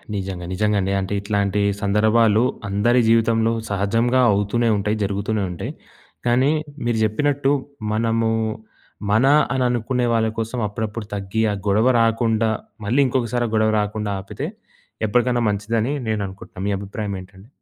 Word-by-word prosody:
నిజంగా 95 -3 -4
నిజంగా 105 +2 +1
అండి. 95 - -1
అంటే 95 +1 -3
ఇట్లాంటి 100 0 0 0.2
సందర్భాలు 110 +2 +3 0.3
అందరి 120 +5 +3
జీవితంలో 115 0 +3 0.2
సహజంగా 115 +6 +1
అవుతూనే 105 +4 +1
ఉంటాయి, 105 +2 -1
జరుగుతూనే 100 +1 -1
ఉంటాయి. 85 - -5 0.6
కానీ 130 +4 +3 0.3
మీరు 120 -1 +1
చెప్పినట్టు 140 +5 +1 0.4
మనము 115 +1 +1 0.8
మన 110 +5 +4 0.3
అని 130 -1 +1
అనుకునే 120 +1 0
వాళ్ళ 115 -1 +2
కోసం 115 +2 -3
అప్పుడప్పుడు 110 +1 -4
తగ్గి 100 +2 -2
ఆ - - -1
గొడవ 110 +5 +3
రాకుండా 115 -1 +2 0.4
మళ్ళీ 120 +7 +1
ఇంకొకసారి 120 -1 0
ఆ - - -9
గొడవ 110 0 +3
రాకుండా 105 0 -2
ఆపితే 95 - -5 0.6
ఎప్పటికైనా 120 +2 +2
మంచిదని 110 +6 -1
నేను 110 -1 0
అనుకుంటున్నాను. 95 0 -8
మీ 100 - +1
అభిప్రాయం 100 +1 -5
ఏంటండి? 95 +2 -15
110 Hz, 135 wpm, -21 LUFS, 100-115 Hz, 0.8 s, మన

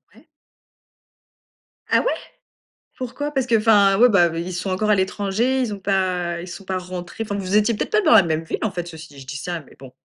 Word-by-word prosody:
Ouais. - - -21 1.6
Ah - - +4
ouais, - - 0 0.9
pourquoi? 290 +4 -4
Parce 265 -3 -1
qu'enfin, 210 -4 +4
ouais, 245 +2 +6
bah, 175 -5 +5
ils 175 +2 -4
sont 185 +2 -3
encore 210 +3 -1
à 210 - +5
l'étranger? 205 +7 0
Ils 220 -4 -2
ont 200 - -7
pas 180 -3 -1
ils 180 - -8
sont 195 - -9
pas 185 -1 -2
rentrés? 180 +3 -6
Enfin, 205 -2 -4
vous 195 0 -2
étiez 215 +2 +3
peut-être - - -3
pas 425 0 +3
dans 320 - +3
la 210 -4 +8
même 160 -1 -1
ville, - - -3
en 220 - -1
fait? 175 -2 -5
Ceci 160 -1 -10
dit, 140 -1 -15
je - - -12
dis 145 +1 -5
ça 170 +1 -4
mais - - -19
bon. 130 -2 -12
195 Hz, 225 wpm, -22 LUFS, 175-220 Hz, 1.6 s, la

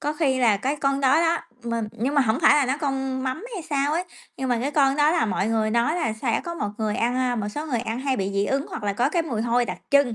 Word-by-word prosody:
có 295 - -1
khi 285 -5 +1
là 225 -5 +4
cái 270 +8 -2
con 275 -1 0
đó 275 +4 +4
đó, 335 0 +2 0.3
mình 230 -2 -2
nhưng 265 +6 -2
mà 285 - +5
hổng 225 0 +1
phải - - +6
là 290 -3 +3
nó 265 - 0
con 265 -2 -2
mắm 260 - -3
hay 370 - -5
sao 285 -1 0
ấy, 345 +3 0 0.3
nhưng 265 -1 -3
mà 245 - +1
cái 275 +3 -1
con 275 -2 +3
đó 295 +1 +4
là 330 -6 +2
mọi 200 +1 -1
người 220 -1 +1
nói 235 +9 +1
là 315 -10 0
sẽ 225 +2 -1
có 340 - -4
một 210 -11 -3
người 215 0 -1
ăn, 240 +1 0
a, 250 -1 0
một 210 -2 -2
số 295 +8 -5
người 245 -6 -1
ăn 230 +1 -4
hay 265 -1 0
bị 195 -1 -2
dị 200 0 +1
ứng 275 +4 -1
hoặc - - -7
là 205 -1 0
có 240 +6 +1
cái 340 -1 +1
mùi 235 -9 -3
hôi 240 +1 +2
đặc - - -5
trưng, 280 -4 +4
260 Hz, 300 wpm, -24 LUFS, 230-290 Hz, 0.3 s, phải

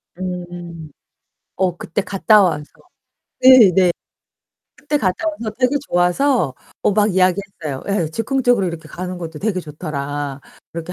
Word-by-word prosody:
음. 175 -3 -7 0.7
어 180 -2 0
그때 180 +5 -3
갔다 205 +2 +4
와서 155 -5 0 0.8
네 255 -6 +8
네. 180 -2 +4 0.8
그때 295 - -2
갔다 235 - 0
와서 235 -8 -4
되게 260 +2 +2
좋아서 175 - +2 0.3
어 - - +3
막 210 -1 +2
이야기했어요. 185 -6 -1
예, 195 -6 0
"즉흥적으로 245 - +1
이렇게 165 -2 -6
가는 180 +2 -6
것도 160 -3 -7
되게 195 -2 -1
좋더라." 145 -3 -5 0.3
그렇게 170 +2 -6
180 Hz, 275 characters per minute, -19 LUFS, 165-210 Hz, 0.8 s, 네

